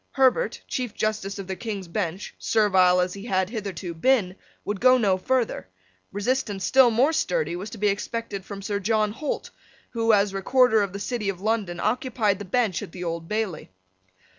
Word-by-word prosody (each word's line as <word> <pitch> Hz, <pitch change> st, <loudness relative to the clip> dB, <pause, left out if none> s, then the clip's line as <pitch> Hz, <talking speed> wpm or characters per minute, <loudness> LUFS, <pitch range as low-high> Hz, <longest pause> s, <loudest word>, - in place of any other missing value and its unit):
Herbert, 270 Hz, -, +2 dB
Chief 250 Hz, -4 st, -3 dB
Justice 210 Hz, -2 st, -2 dB
of 195 Hz, -, -6 dB
the 190 Hz, 0 st, -4 dB
King's 200 Hz, -3 st, -5 dB
Bench, 180 Hz, 0 st, -3 dB
servile 185 Hz, -4 st, +4 dB
as 180 Hz, 0 st, -1 dB
he 200 Hz, +2 st, -8 dB
had 190 Hz, -3 st, 0 dB
hitherto 195 Hz, -6 st, -5 dB
been, 185 Hz, 0 st, +2 dB, 0.3 s
would 205 Hz, -1 st, -3 dB
go 255 Hz, +1 st, +6 dB
no 200 Hz, -6 st, +3 dB
further. 235 Hz, -, -1 dB, 0.4 s
Resistance 205 Hz, -2 st, -1 dB
still 260 Hz, -2 st, +6 dB
more 255 Hz, +8 st, +3 dB
sturdy 475 Hz, -, 0 dB
was 190 Hz, +4 st, -6 dB
to 225 Hz, -, -9 dB
be 210 Hz, 0 st, +1 dB
expected 205 Hz, 0 st, -3 dB
from 200 Hz, 0 st, -8 dB
Sir 200 Hz, 0 st, -2 dB
John 215 Hz, +1 st, +1 dB
Holt, 285 Hz, +6 st, -4 dB, 0.4 s
who, 230 Hz, -1 st, +2 dB
as 200 Hz, -2 st, +3 dB
Recorder 235 Hz, +3 st, +3 dB
of 200 Hz, -2 st, -2 dB
the -, -, -4 dB
City 210 Hz, -1 st, -2 dB
of 190 Hz, -3 st, -4 dB
London, 205 Hz, -4 st, -1 dB
occupied 215 Hz, -2 st, 0 dB
the 205 Hz, -, -6 dB
bench 215 Hz, -2 st, 0 dB
at -, -, -8 dB
the 180 Hz, -, -6 dB
Old 165 Hz, -1 st, -4 dB
Bailey. 210 Hz, -6 st, -3 dB
205 Hz, 185 wpm, -25 LUFS, 190-230 Hz, 0.4 s, go